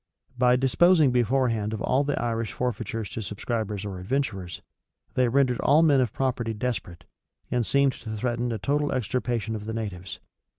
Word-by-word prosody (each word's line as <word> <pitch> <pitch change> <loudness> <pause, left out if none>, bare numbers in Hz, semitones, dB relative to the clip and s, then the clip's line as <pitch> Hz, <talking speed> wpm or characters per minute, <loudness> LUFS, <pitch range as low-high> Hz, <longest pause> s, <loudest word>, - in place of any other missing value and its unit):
By 125 0 +4
disposing 150 +3 +4
beforehand 120 -3 +1
of 110 - -4
all 135 +2 +2
the 145 0 -1
Irish 115 -1 -2
forfeitures 115 -3 -3
to 115 - -4
subscribers 105 0 -3
or 95 -3 -5
adventurers, 95 - -3 0.5
they 125 -1 +3
rendered 125 -1 +2
all 150 +3 +4
men 145 -5 +5
of 120 -5 0
property 120 -4 -1
desperate, 105 -7 -4 0.5
and 125 -1 +1
seemed 140 +3 +3
to 110 -2 -7
threaten 120 +1 -1
a 115 - -1
total 145 +8 0
extirpation 120 -2 -1
of 105 -1 -6
the 110 - -4
natives. 100 -5 -5
120 Hz, 165 wpm, -26 LUFS, 110-130 Hz, 0.5 s, men